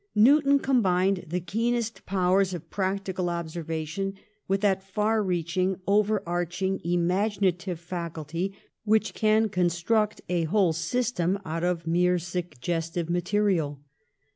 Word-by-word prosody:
Newton 280 +5 +6
combined 195 -8 +2
the 175 +3 -1
keenest 230 +5 -2
powers 185 0 +2
of 170 - -10
practical 190 -2 -1
observation 165 +2 -3 0.3
with 195 +1 +1
that 195 -2 +2
far 210 +3 0
reaching, 180 0 0
over 210 0 +2
arching 175 +2 -1
imaginative 180 0 0
faculty 170 0 -4 0.3
which 215 0 +2
can 215 0 +3
construct 195 +3 +1
a 175 -2 0
whole 180 0 +2
system 195 0 0
out 165 +1 -3
of 175 -2 0
mere 180 +2 +3
suggestive 170 -1 -3
material. 175 -5 +1
185 Hz, 115 wpm, -27 LUFS, 170-205 Hz, 0.3 s, Newton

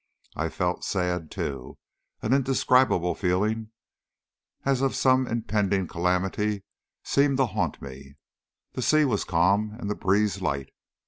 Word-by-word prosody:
I - - -1
felt 90 0 -2
sad 90 -4 -1
too. 65 -2 -5 0.5
An 110 - +1
indescribable 130 -8 +3
feeling, 105 +4 0 1.0
as 135 -2 +2
of 135 -1 +1
some 130 -1 +3
impending 105 -4 0
calamity, 95 +4 -1 0.4
seemed 140 -1 +2
to 135 - +3
haunt 115 - -2
me. 70 +1 -10 0.6
The - - -4
sea 155 -1 +4
was 110 -7 0
calm, 100 +5 +1
and 105 -3 -3
the - - -1
breeze 100 0 +1
light. 70 -1 -2
105 Hz, 130 wpm, -26 LUFS, 90-125 Hz, 1.0 s, sea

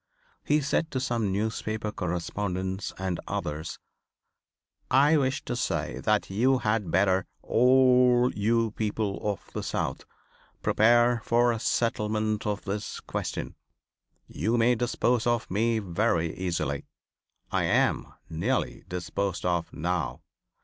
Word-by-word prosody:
He 150 +1 +2
said 150 +3 0
to 130 - -2
some 115 -5 -1
newspaper 110 +1 -2
correspondents 95 +1 -3
and 95 -2 -2
others: 75 +3 -4 1.1
"I 145 +4 +5
wish 135 -2 0
to - - -2
say - - -2
that - - +1
you 130 +7 +3
had 105 -5 0
better 95 +1 +2 0.2
all 125 0 +5
you 115 +2 +1
people 105 -2 -2
of 105 -3 -4
the - - -3
South - - -3 0.6
prepare 120 +1 +4
for 120 +1 +3
a 115 - -2
settlement 110 -2 0
of 105 0 -2
this 100 +1 -4
question. - - -4 0.7
You 110 +10 -1
may 120 +2 +4
dispose 120 0 +1
of 120 -4 0
me 115 +4 +2
very 90 -4 0
easily. 85 -6 -2 0.6
I - - +1
am - - +1 0.2
nearly 95 +12 -2
disposed 90 +1 -3
of 85 -2 0
now. 80 -7 -2
110 Hz, 120 wpm, -27 LUFS, 95-120 Hz, 1.1 s, I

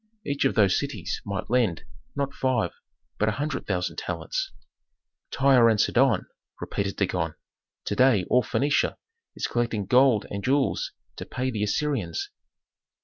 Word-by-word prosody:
"Each 140 -1 0
of 135 - +2
those 100 -4 +4
cities - - -4
might 100 +2 -4
lend, 115 -9 +2 0.3
not 140 -1 -2
five, 130 -1 0 0.5
but 110 - +3
a - - -1
hundred 145 0 -3
thousand 90 -2 -2
talents." - - -3 0.8
"Tyre 130 -4 +5
and 110 -2 +2
Sidon!" 120 +2 +3 0.3
repeated 100 -1 -3
Dagon. 90 -5 -1 0.5
"To 105 - -1
day 120 -6 +4
all 125 - +4
Phœnicia 140 +6 +1 0.4
is - - -2
collecting 115 -4 -1
gold 125 -1 +4
and 100 0 -4
jewels 135 +1 +1 0.3
to - - -6
pay 130 0 -2
the 110 -4 -3
Assyrians. 105 - -1
120 Hz, 145 wpm, -26 LUFS, 100-135 Hz, 0.8 s, Tyre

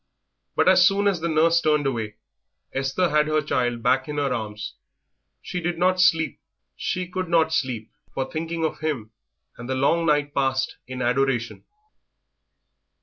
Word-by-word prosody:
But - - +2
as 185 -1 +7
soon 200 +1 +2
as 195 -4 +1
the 170 - -1
nurse 165 +2 +3
turned 150 -2 +2
away 115 -6 -2 0.6
Esther 135 +7 0
had 150 0 +3
her 155 0 +2
child 120 -5 -1
back 130 +1 +2
in 150 - -4
her 140 -3 +1
arms. 105 -3 -5 0.7
She 180 - -4
did 175 0 -2
not 185 +1 +2
sleep. 165 -3 +3 0.4
She 185 0 -2
could 185 -1 -4
not 160 -2 +3
sleep 125 -7 -2 0.2
for 135 - -2
thinking 165 +2 -3
of 160 - -3
him, 140 -9 -3 0.5
and 120 +1 -8
the 130 - 0
long 165 +6 +2
night 145 -1 +2
passed 135 -1 0
in 130 0 -4
adoration. 125 -1 0
150 Hz, 160 wpm, -24 LUFS, 130-165 Hz, 0.7 s, as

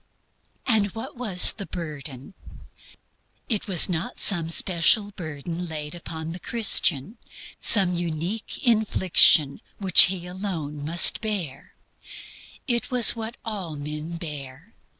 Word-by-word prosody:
And 220 -4 +1
what 230 +5 -8
was 215 -8 +5
the 200 - -10
"burden"? 150 -3 -8 1.1
It 220 -2 0
was 185 -4 +4
not 180 +6 -5
some 170 -5 +3
special 185 +5 +2
burden 170 -1 -8
laid 150 -2 -7
upon 160 -2 -8
the 175 - -9
Christian, 210 - +1 0.4
some 190 -5 +4
unique 175 +5 -5
infliction 190 - +3 0.2
that 190 -3 +5
they 180 -2 -5
alone 175 -6 -7
must 165 +3 +4
bear. 190 -11 -5 0.9
It 240 0 -2
was 250 -3 +4
what 230 +1 -8
all 195 -8 -6
men 150 +3 -7
bear. 150 +3 -8
175 Hz, 115 wpm, -23 LUFS, 155-210 Hz, 1.1 s, was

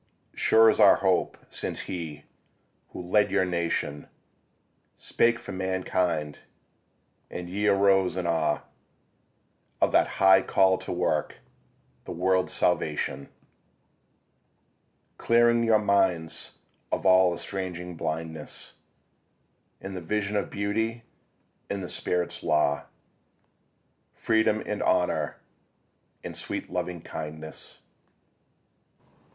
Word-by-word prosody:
Sure 110 0 +5
is 110 - +3
our 105 -2 +8
hope 95 -2 +1
since - - -4
he, 80 -5 -6 0.7
who - - -8
led 100 +3 +2
your 95 -1 +2
nation, 85 -4 -2 0.9
Spake 115 0 +2
for 120 - -9
mankind; 90 -5 -1 0.9
and 90 0 -6
ye 100 +4 -1
arose 95 -2 +3
in 90 - -2
awe 80 -3 +1 1.2
Of - - +3
that - - +4
high 95 0 +6
call 95 0 +3
to - - -6
work 90 -4 -1 0.7
the - - -7
world's 95 +1 +1
salvation; 75 -5 -1 1.9
Clearing 120 0 +4
your 115 -1 +4
minds 95 -6 0 0.4
of - - -2
all 95 -1 +6
estranging 90 -2 -5
blindness 80 -1 -5 1.0
In 95 0 -7
the 90 - -5
vision 105 +4 -2
of 100 - -1
Beauty, 110 +3 -2 0.7
and 100 -1 -3
the - - -4
Spirit's 90 -1 -2
law, 75 -1 +1 1.3
Freedom 110 -1 +1
and - - -3
Honour - - +1 0.9
and - - -6
sweet - - -5
Loving 90 -1 -3
kindness. 80 0 -7
95 Hz, 100 wpm, -27 LUFS, 85-100 Hz, 1.9 s, our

